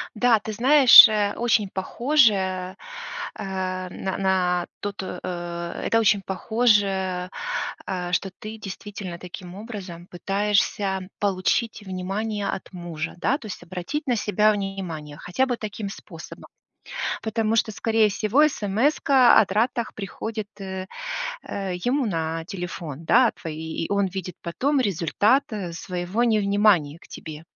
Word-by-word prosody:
Да, 230 -1 +4
ты 215 +1 -6
знаешь, 260 +2 +9
э, 210 -2 0
очень 225 -4 +1
похоже, 235 +6 +3
э, 185 -1 -3 0.6
м, 185 -1 -4
н 190 - -2
на 180 -2 +1
то 205 - -3
то, 190 -2 -6
э, 175 -1 -5
это 225 - +3
очень 210 -2 +3
похоже, 195 -3 +1 0.6
э, 180 -2 -3
что 190 +1 0
ты 215 +1 -7
действительно 195 -3 -7
таким 180 0 -9
образом 195 -6 -8
пытаешься 195 0 0
получить 205 +3 0
внимание 200 +3 -3
от 190 - -5
мужа, 170 -3 -5
да, 260 +10 +1
то 255 - -13
есть 205 - -7
обратить 185 - -5
на 245 - +2
себя 210 0 +2
внимание 185 -7 -5
хотя 180 +11 0
бы 245 -2 -2
таким 210 -2 -5
способом. - - -11 0.7
Потому 225 0 0
что, 220 - +1
скорее 220 +3 +2
всего, 225 +8 +3
эсэмэска 260 +3 +4
о 205 - +3
тратах 230 +3 -1
приходит, 215 +1 -5
э, 190 -1 -5 0.6
э, 195 -2 -4
ему 265 +3 +1
на 165 -3 -2
телефон, 170 -5 -6
да, 240 +7 +5
твои, 160 0 -5
и - - -7
он 200 -1 +2
видит 185 -1 -5
потом 265 - 0
результат 205 - +2 0.3
своего 180 +5 -2
невнимания 200 -8 +3
к - - -18
тебе. 155 0 -9
195 Hz, 135 wpm, -24 LUFS, 180-220 Hz, 0.7 s, знаешь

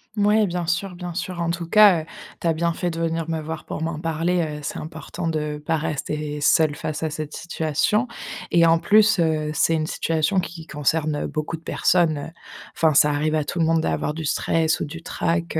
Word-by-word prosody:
Mouais 210 0 +3
bien 175 -1 -2
sûr, 175 +2 -1
bien 175 -1 -6
sûr 180 0 -4
en 170 0 0
tout 170 -1 -4
cas, 205 -4 +7
heu, - - -10 0.4
tu - - -1
as 165 - +3
bien 170 +1 0
fait 175 +1 -2
de 165 0 -5
venir 165 0 -1
me 160 -1 -1
voir 160 0 -6
pour - - -5
m'en 160 -1 -3
parler, 165 +2 0
heu, 150 -2 -3
c'est - - -4
important 160 +1 -6
de 150 -2 -2
pas 160 +1 0
rester 150 0 -3
seul 155 +1 +4
face 155 +1 -4
à 155 - -1
cette 155 0 -5
situation 170 - 0 0.4
et 170 -1 +5
en 165 0 +4
plus, 215 +2 +4
heu, 155 -2 +1
c'est 165 - +2
une 155 -1 0
situation 165 +3 0
qui 170 -2 -6
concerne, 150 +1 0
heu, - - -2
beaucoup 155 +2 -3
de - - -19
personnes, 165 -2 +2
heu 145 - -6 0.5
enfin, 155 -3 +3
ça 150 0 +5
arrive 155 +2 0
à 155 - +1
tout 175 - -4
le 165 - +3
monde 165 0 +2
d'avoir 150 - -1
du 160 0 -4
stress 160 +1 +1
ou - - -2
du 165 +3 -9
trac, 170 -1 -1
160 Hz, 225 wpm, -23 LUFS, 155-170 Hz, 0.5 s, cas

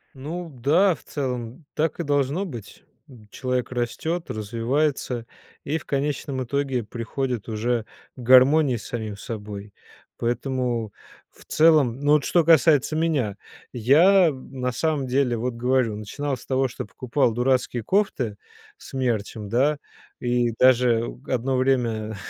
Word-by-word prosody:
Ну 165 +6 -6
да, 155 +8 +2
в - - -19
целом, 125 0 -5
так 160 +2 -1
и - - -1
должно 145 +5 0
быть. 120 - -10 0.2
М, 115 -5 -15
человек 125 +2 -2
растет, 160 +8 -2
развивается 120 +3 -1 0.4
и 150 +3 0
в 160 - -11
конечном 140 -1 -2
итоге 135 -2 -1
приходит 120 0 -4
уже 115 +1 -1 0.3
к - - -15
гармонии 130 +2 +5
с 110 - -10
самим 110 -5 -5
собой, 105 -3 -7 0.4
поэтому, 120 -2 -2 0.4
в - - -19
целом, 155 -6 +3
ну 145 +1 +3
вот 150 -2 +4
что 170 -3 +2
касается 155 -1 +4
меня, 145 -11 0 0.4
я, 170 - +5
м, 130 -2 -8
на 125 0 0
самом 150 +2 -1
деле 125 -1 +1
вот, 120 +1 -3
говорю, 125 -3 +1
начинал 135 +6 -4
с - - -15
того, 130 -1 +1
что - - -6
я - - -12
покупал 120 +2 0
дурацкие 125 -1 0
кофты 130 - 0 0.4
с - - -14
мерчем, 110 -5 -2
да, 140 +6 +2 0.4
и 120 -1 +1
даже 125 -2 +3
одно 130 +1 0
время 115 -5 0
130 Hz, 145 wpm, -24 LUFS, 115-145 Hz, 0.4 s, гармонии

